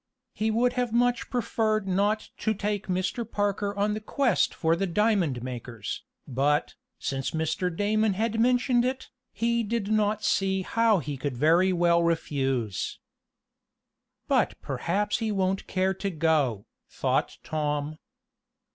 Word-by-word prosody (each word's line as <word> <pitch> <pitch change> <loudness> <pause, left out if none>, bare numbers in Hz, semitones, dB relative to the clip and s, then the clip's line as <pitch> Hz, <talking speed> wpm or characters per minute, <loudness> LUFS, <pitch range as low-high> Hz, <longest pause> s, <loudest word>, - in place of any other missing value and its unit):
He 220 +2 0
would 240 +3 +2
have 250 -2 -1
much 245 +1 +1
preferred 215 -3 0
not 205 +3 +1
to 220 - 0
take 205 0 -2
Mr. 185 +6 -1
Parker 205 -2 -1
on 205 +1 +1
the 215 - -3
quest 240 0 +1
for 165 0 +1
the 195 +3 -1
diamond 175 - +1
makers, 120 -4 -5 0.3
but, 140 +3 +1 0.2
since 135 -1 -2
Mr. 160 +3 0
Damon 205 +4 +1
had 225 +3 -1
mentioned 245 +1 +3
it, 260 +1 -3 0.2
he 235 +1 0
did 220 -1 -2
not 215 0 +1
see 190 -1 +1
how 230 +1 +3
he 145 -4 -4
could 130 -1 -3
very 170 +7 +4
well 170 -1 +3
refuse. 135 - -1 1.3
"But - - +2
perhaps 205 +4 -1
he 220 -1 -1
won't 190 -1 0
care 190 0 +1
to 195 +1 -3
go," 155 - +1 0.2
thought - - -1
Tom. 150 0 -2
195 Hz, 140 wpm, -27 LUFS, 160-220 Hz, 1.3 s, very